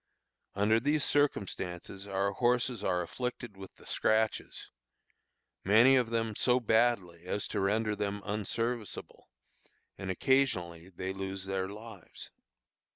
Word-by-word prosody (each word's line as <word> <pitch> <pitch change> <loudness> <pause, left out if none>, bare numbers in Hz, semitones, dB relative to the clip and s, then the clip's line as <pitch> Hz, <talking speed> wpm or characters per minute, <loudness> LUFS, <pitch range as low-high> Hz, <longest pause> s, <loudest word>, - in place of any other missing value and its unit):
Under 105 +3 +3
these 145 +4 +1
circumstances 100 -8 -1
our 100 0 0
horses 120 0 +1
are 90 -2 +1
afflicted 120 +2 -5
with 95 -1 -11
the - - -18
scratches, 110 0 0 0.9
many 115 +7 +6
of 125 -3 +2
them 115 -2 -1
so 125 +3 +3
badly 110 -7 +1
as 100 +2 -2
to - - -2
render 105 +2 +1
them 100 0 -3
unserviceable, 110 +2 -3 0.7
and 95 - -5
occasionally 90 -7 +1
they 95 +1 -5
lose 95 0 -5
their 95 -1 -2
lives. 105 -3 -10
105 Hz, 120 wpm, -31 LUFS, 95-120 Hz, 0.9 s, many